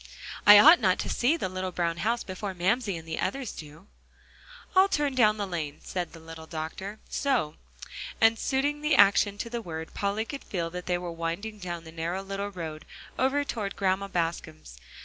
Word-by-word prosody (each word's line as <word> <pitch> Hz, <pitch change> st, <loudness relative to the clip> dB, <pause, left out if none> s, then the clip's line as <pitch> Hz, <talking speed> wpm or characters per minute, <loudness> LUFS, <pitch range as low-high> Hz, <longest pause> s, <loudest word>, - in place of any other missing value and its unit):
"I 205 Hz, 0 st, +12 dB
ought 315 Hz, +11 st, +9 dB
not 185 Hz, -5 st, +3 dB
to -, -, -4 dB
see 275 Hz, +7 st, +2 dB
the 305 Hz, -, -2 dB
little 185 Hz, 0 st, -4 dB
brown 170 Hz, -1 st, -1 dB
house 230 Hz, +7 st, 0 dB
before 190 Hz, +1 st, -5 dB
Mamsie 195 Hz, +2 st, 0 dB
and 165 Hz, 0 st, -11 dB
the 160 Hz, -, -4 dB
others 250 Hz, +5 st, -2 dB
do." 155 Hz, +3 st, -11 dB, 0.9 s
"I'll 380 Hz, +1 st, +6 dB
turn 295 Hz, -5 st, 0 dB
down 215 Hz, -4 st, +4 dB
the 205 Hz, -, -2 dB
lane," 160 Hz, -6 st, -4 dB
said 175 Hz, -3 st, -4 dB
the 165 Hz, -, -11 dB
little 160 Hz, 0 st, -10 dB
doctor, 165 Hz, +6 st, -6 dB
"so"; 255 Hz, -, 0 dB, 0.7 s
and 225 Hz, 0 st, +4 dB
suiting 290 Hz, +2 st, 0 dB
the 300 Hz, 0 st, +2 dB
action 200 Hz, 0 st, +5 dB
to 220 Hz, -, -4 dB
the 235 Hz, -1 st, -3 dB
word, 160 Hz, -4 st, -7 dB
Polly 200 Hz, +2 st, -1 dB
could 280 Hz, +3 st, -7 dB
feel 170 Hz, -4 st, -3 dB
that 180 Hz, 0 st, -7 dB
they 180 Hz, -1 st, +1 dB
were 175 Hz, -1 st, -5 dB
winding 170 Hz, +6 st, -4 dB
down 175 Hz, -3 st, -5 dB
the 160 Hz, -, -11 dB
narrow 170 Hz, +4 st, -3 dB
little 195 Hz, +1 st, -4 dB
road 160 Hz, -5 st, -7 dB, 0.4 s
over 270 Hz, +2 st, +2 dB
toward 210 Hz, -7 st, -4 dB
Grandma 195 Hz, 0 st, 0 dB
Bascom's. 165 Hz, -, -4 dB
190 Hz, 190 wpm, -28 LUFS, 165-225 Hz, 0.9 s, I